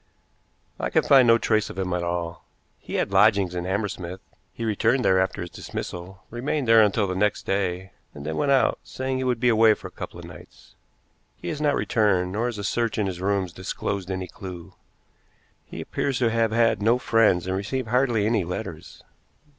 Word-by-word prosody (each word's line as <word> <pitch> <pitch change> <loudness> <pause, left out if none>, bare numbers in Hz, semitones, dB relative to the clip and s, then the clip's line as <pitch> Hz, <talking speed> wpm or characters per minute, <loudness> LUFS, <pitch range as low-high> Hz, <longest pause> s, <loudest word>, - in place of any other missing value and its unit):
"I - - -1
can - - +2
find 130 -3 +6
no 115 0 +6
trace 110 -2 +1
of - - -9
him 95 -2 -2
at 90 - -1
all. 85 -1 -3 0.4
He - - -7
had - - 0
lodgings 100 -2 +4
in 90 0 -3
Hammersmith. 95 -2 -3 0.3
He 115 - -5
returned 115 +4 +1
there 95 0 +4
after 95 0 -1
his 90 - -6
dismissal, 90 +2 -7
remained 130 +3 -2
there 115 0 +7
until 105 0 +3
the 95 - -2
next 105 +2 0
day, 95 -1 -2 0.2
and 70 0 -8
then 80 - -3
went 140 - +1
out, 135 -2 +3
saying 130 0 -4
he 130 - -2
would 125 -2 0
be 125 +1 +3
away 110 -1 +5
for - - -9
a - - -28
couple - - -8
of - - -9
nights. - - -14 0.6
He - - -7
has 150 - -4
not 145 -2 +2
returned; 100 -6 +1
nor 110 +5 -1
has 120 -3 -4
a 100 - -5
search 115 +2 -1
in 105 - +1
his 90 -2 -4
rooms 95 -2 0
disclosed 95 +1 -4
any 95 -1 -3
clew. 90 -2 -9 0.9
He - - -8
appears 135 -3 -2
to 120 -3 +2
have 115 -1 +1
had 115 -2 +2
no 115 +4 +4
friends 115 -8 +3
and 95 0 -2
received 110 +5 -3
hardly 120 -4 +2
any 110 -3 +1
letters." 90 +2 -7
105 Hz, 200 wpm, -24 LUFS, 95-115 Hz, 0.9 s, there